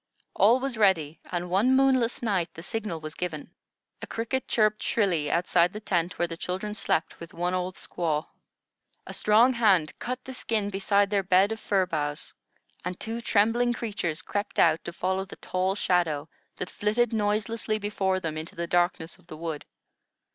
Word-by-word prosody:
All 230 +6 +5
was 265 -3 -3
ready, 165 -7 +3
and 175 0 -2
one 205 +9 +3
moonless 260 -2 +3
night 185 -7 0
the 165 - -9
signal 205 -4 -3
was 155 -1 -6
given. 165 -3 -5 0.5
A - - -6
cricket 230 +3 -2
chirped 215 -1 +2
shrilly 175 -9 +1
outside 175 +1 +2
the 210 - -5
tent 175 -4 -1
where 175 - +1
the 165 - -6
children 190 +5 -3
slept 165 -6 -1
with 170 - -10
one 175 +2 -1
old 185 0 -2
squaw. 155 -3 -2 0.8
A - - -7
strong 225 +5 +4
hand 195 -10 +3
cut 250 +1 -3
the 265 - -7
skin 215 -5 -1
beside 200 +1 +2
their 200 -1 +3
bed 190 +2 +4
of 225 - -3
fir 195 -3 +1
boughs, 145 -3 -3 0.5
and 180 0 -4
two 225 +1 -4
trembling 235 +2 +2
creatures 190 -8 -3
crept 205 0 -3
out 165 -1 +4
to - - -4
follow 190 +2 -1
the 195 - -11
tall 185 +1 -1
shadow 165 -7 +1 0.3
that 180 - -5
flitted 215 +3 +1
noiselessly 215 +1 0
before 195 -3 0
them 155 -3 -3
into 160 - -8
the 170 - -2
darkness 175 0 0
of 175 - -25
the 155 - -9
wood. 160 -2 -5
190 Hz, 175 wpm, -27 LUFS, 170-215 Hz, 0.8 s, All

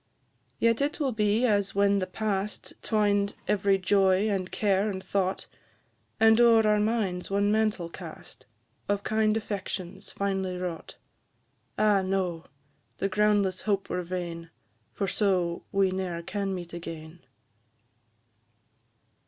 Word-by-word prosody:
Yet 230 +7 +1
will 285 -3 +1
it 245 - -5
be 215 +3 +2
as 205 -4 +1
when 200 0 +3
the 185 - -2
past 205 +1 -3
Twined 205 -2 +1
every 200 -1 +2
joy, 195 +1 +3
and 185 -2 -2
care, 200 0 +1
and 190 -2 -5
thought, 190 -1 -1 0.7
And 220 +1 +6
o'er 225 -2 +6
our 210 0 +3
minds 210 -5 -1
one 200 +1 +2
mantle 215 -5 +1
cast, 170 -1 -11 0.4
Of 205 0 0
kind 215 0 +2
affections 195 -4 -5
finely 190 -2 -2
wrought. 180 -3 -5 0.8
Ah, 210 -2 +4
no! 185 -3 -2 0.5
the 195 - -1
groundless 205 -2 +2
hope 200 -2 -1
were 180 - -1
vain, 170 -2 -5 0.4
For 195 - -2
so 180 -4 0
we 195 -1 +2
ne'er 180 -3 -3
can 195 +1 -3
meet 175 -1 -7
again! 165 -1 -8
195 Hz, 130 wpm, -27 LUFS, 185-210 Hz, 0.8 s, And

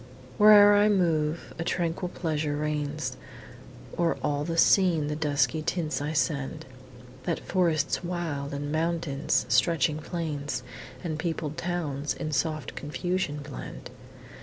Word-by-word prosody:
Where'er 205 -1 +9
I 205 +1 +5
move, 165 -5 +1
a - - 0
tranquil 175 +1 -1
pleasure 155 -4 -2
reigns; 150 -3 -2 0.8
O'er 170 -1 +2
all 145 0 0
the 165 +2 -3
scene 165 -5 +4
the 150 - -2
dusky 150 +1 +1
tints 160 -2 -2
I 145 +1 -2
send, 145 -3 -1 0.6
That 170 - -1
forests 170 -4 +1
wild 165 -5 -3
and 145 +1 -4
mountains, 160 -4 0
stretching 150 +4 +2
plains 145 -6 -4 0.4
And 160 -3 -3
peopled 160 -3 -3
towns, 155 -5 -2
in 155 -2 -4
soft 155 +1 -1
confusion 150 0 -2
blend. 140 - -8
155 Hz, 125 wpm, -27 LUFS, 145-170 Hz, 0.8 s, Where'er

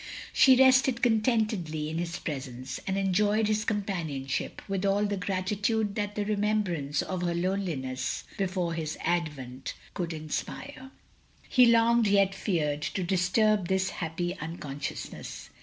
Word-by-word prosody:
She 260 -1 +7
rested 260 -1 +5
contentedly 215 -9 +1
in 160 +2 -3
his 175 0 -3
presence, 130 -3 -5
and 190 0 0
enjoyed 205 +3 +2
his 215 0 +1
companionship, 170 - -2
with 195 -1 -2
all 200 +1 +2
the 205 0 -1
gratitude 200 +3 -1
that 205 0 -3
the 210 - -1
remembrance 200 -9 0
of 185 -1 -3
her 175 -1 0
loneliness 170 -9 -2
before 185 -3 -1
his 160 -2 -3
advent, 150 -7 -2 0.2
could 175 -2 -3
inspire. 260 - -5 0.6
He 250 -2 +6
longed, 230 -1 +5
yet 200 -1 +4
feared, 155 -7 -1
to 185 +4 -2
disturb 190 +2 +2
this 190 0 +1
happy 175 +2 -3
unconsciousness. 150 -3 -6
190 Hz, 130 wpm, -28 LUFS, 160-210 Hz, 0.6 s, She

